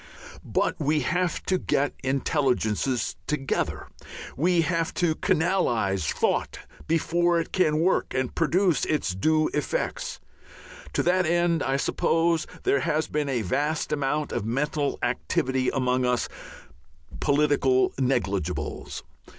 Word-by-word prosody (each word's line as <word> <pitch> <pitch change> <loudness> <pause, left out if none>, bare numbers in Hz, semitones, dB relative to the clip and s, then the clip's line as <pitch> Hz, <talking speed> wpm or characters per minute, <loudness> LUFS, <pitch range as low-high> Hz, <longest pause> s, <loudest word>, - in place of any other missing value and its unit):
But - - 0
we 150 0 +1
have 180 +5 -1
to 185 -1 +1
get 145 -4 0
intelligences 130 -3 0
together, 140 -3 -2 0.5
we 175 +4 +3
have 165 0 -1
to 175 -3 +2
canalize 160 - +1
thought - - 0 0.3
before 170 +1 +2
it 165 - -4
can 155 -5 +2
work 185 +3 +1
and 130 -1 -1
produce 175 +2 +2
its 150 -12 0
due 155 +11 +2
effects. 150 - -2 0.7
To - - +1
that 180 0 +2
end, 170 -1 +2
I 135 0 0
suppose, 165 +3 +1 0.2
there 140 - +2
has 150 +4 0
been 150 -1 -2
a 125 -4 0
vast 150 - -1
amount 150 +1 -1
of - - -2
mental 140 +5 -1
activity 130 +1 0
among 130 -1 +1
us 125 -1 +1 0.9
political 145 -3 +3
"negligibles." 120 - -2
150 Hz, 120 wpm, -26 LUFS, 130-165 Hz, 0.9 s, we